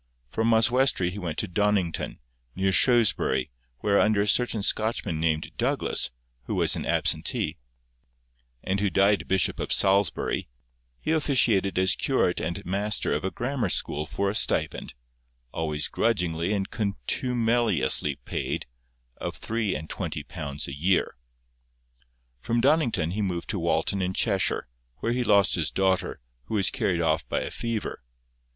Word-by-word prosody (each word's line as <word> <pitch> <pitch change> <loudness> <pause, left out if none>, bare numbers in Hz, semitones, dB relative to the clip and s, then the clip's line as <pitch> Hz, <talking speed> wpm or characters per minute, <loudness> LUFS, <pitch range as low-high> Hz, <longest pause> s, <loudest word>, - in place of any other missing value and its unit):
From 115 +1 +1
Oswestry 115 -4 +3
he 100 - -7
went 85 -5 -4
to - - -1
Donnington, 100 -2 0 0.4
near 95 +1 +1
Shrewsbury, 95 - +2 0.3
where, 100 -1 +3
under 105 -1 +3
a - - -3
certain 115 -1 +2
Scotchman 110 -7 0
named 80 -1 0
Douglas, - - 0 0.4
who - - -3
was - - +2
an - - -4
absentee, - - +1 1.0
and 95 +1 -1
who 100 0 +1
died 100 +1 +2
Bishop 95 -1 +1
of - - -3
Salisbury, 95 -4 +1 0.5
he - - -2
officiated 120 -11 +2
as 95 +1 +4
curate - - +1
and - - -4
master 100 +3 0
of - - -2
a 95 - 0
grammar 125 +4 -2
school 75 +1 +1
for 100 - -2
a 100 - 0
stipend—always 60 - -2
grudgingly 90 -5 0
and 100 -2 -2
contumeliously 110 - +1
paid—of - - -6
three 110 -3 -2
and 80 - -5
twenty 75 - -4
pounds 75 -4 -5
a 70 - -6
year. 85 +7 +1 1.2
From 115 - -1
Donnington 120 - +2
he 105 +4 -2
removed 90 -4 -2
to - - -3
Walton 100 - 0
in 95 0 -2
Cheshire, 100 -5 +1 0.3
where 115 - -1
he 125 0 0
lost 100 -4 +4
his 80 -3 +1
daughter, 95 -1 0 0.3
who 110 - -4
was 100 -3 +2
carried 85 -3 0
off 80 -1 0
by - - 0
a - - -5
fever. 115 - -4
95 Hz, 145 wpm, -26 LUFS, 80-110 Hz, 1.2 s, as